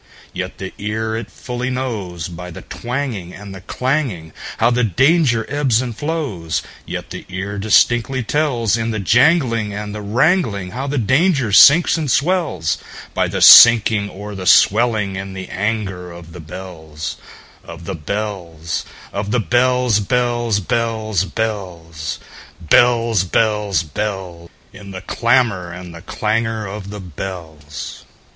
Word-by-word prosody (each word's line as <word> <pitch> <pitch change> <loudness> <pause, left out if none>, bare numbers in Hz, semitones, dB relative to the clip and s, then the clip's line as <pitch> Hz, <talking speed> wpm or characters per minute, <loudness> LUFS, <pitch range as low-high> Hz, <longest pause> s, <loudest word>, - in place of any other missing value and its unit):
Yet - - -5
the 95 -1 -7
ear 110 +2 -2
it 110 -2 -5
fully 125 +5 -5
knows, 105 -10 -4
By 90 +1 -8
the 85 - -10
twangingAnd 105 -7 -5
the 95 - -10
clanging, 125 - -2 0.2
How 115 +2 +3
the 125 +1 +1
danger 130 - +2
ebbs 135 -5 +1
and 125 -3 -4
flows; 135 - -3 0.2
Yet - - -6
the - - -7
ear 100 +2 -5
distinctly 120 +4 +2
tells, 120 -5 0
In 115 0 -2
the 110 -2 -2
janglingAnd 115 - +2
the 105 - -6
wrangling, 115 - +1
How 130 +4 -4
the 145 +1 -2
danger 135 - +2
sinks 150 - +7
and 150 -3 -2
swells,—By 150 - -1
the - - -1
sinking 110 -3 +8
or 105 +2 -8
the 95 -2 -6
swelling 105 -3 +3
in 95 0 -6
the 95 0 -7
anger 95 -3 -3
of 85 -1 -12
the 90 - -9
bells, 80 -2 -8 0.5
Of 85 0 -11
the - - -4
bells, 85 -2 -4 0.3
Of 100 +1 -3
the 120 +3 +1
bells, 125 -1 +2
bells, 120 0 0
bells, 110 -3 -1
bells, 90 -8 -4 0.4
Bells, 115 +4 +3
bells, 105 -2 +1
bells—In 95 +2 -7
the 95 -1 -7
clamor 115 -6 +1
and 90 0 -9
the 85 - -10
clangor 110 +3 -2
of 100 0 -7
the 105 0 -7
bells! 80 -4 -8
105 Hz, 135 wpm, -18 LUFS, 95-120 Hz, 0.5 s, sinking